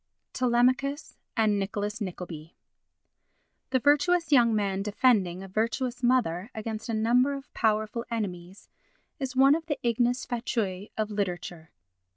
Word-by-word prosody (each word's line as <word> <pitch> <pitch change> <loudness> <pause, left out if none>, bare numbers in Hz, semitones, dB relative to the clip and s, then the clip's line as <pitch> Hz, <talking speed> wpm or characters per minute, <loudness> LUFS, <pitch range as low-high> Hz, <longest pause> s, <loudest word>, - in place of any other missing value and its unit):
Telemachus 255 +4 +1 0.2
and 215 -2 +3
Nicholas 205 +3 -3
Nickleby 175 -4 -7 1.1
The 260 - +2
virtuous 305 +5 +2
young 235 -5 +5
man 195 -2 0
defending 200 -4 +2
a - - -8
virtuous 230 +5 -2
mother 230 -7 +1
against 220 +1 -5
a - - -1
number 245 +5 +3
of 275 0 -10
powerful 220 +1 0
enemies 190 -5 -5 0.5
is 265 -2 -4
one 270 +2 +6
of 325 +1 -2
the 295 - -1
ignes 240 +2 +1
fatui 220 -5 -3
of 215 -1 -1
literature. 175 -5 -4
225 Hz, 130 wpm, -27 LUFS, 200-255 Hz, 1.1 s, one